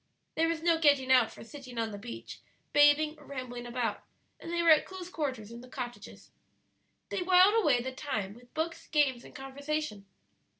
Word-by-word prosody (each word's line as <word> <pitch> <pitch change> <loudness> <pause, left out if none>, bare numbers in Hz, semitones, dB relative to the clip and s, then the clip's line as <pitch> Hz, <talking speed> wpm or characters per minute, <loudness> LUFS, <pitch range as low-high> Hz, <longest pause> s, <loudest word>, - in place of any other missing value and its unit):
There 325 +1 +2
was 330 -1 -2
no 335 -1 +3
getting 285 -4 +4
out 250 -3 +5
for - - -11
sitting 255 0 -11
on 225 -1 -1
the 205 - -7
beach, 235 +3 -8 0.3
bathing, 300 +1 +5
or 295 - -16
rambling 245 -3 -6
about, 240 -3 -2 0.4
and 335 - -7
they 340 0 0
were 335 - +6
at 310 - +6
close 370 -2 -8
quarters 260 - -4
in 235 0 -9
the 250 - -13
cottages. 245 -2 -8 0.8
They - - -2
whiled 365 +2 +6
away 300 - +3
the 260 - -3
time 220 -8 -4
with 245 +2 -18
books, 325 +1 -3
games, 280 -6 +2
and - - -14
conversation. 270 -5 -4
275 Hz, 185 wpm, -30 LUFS, 245-320 Hz, 0.8 s, were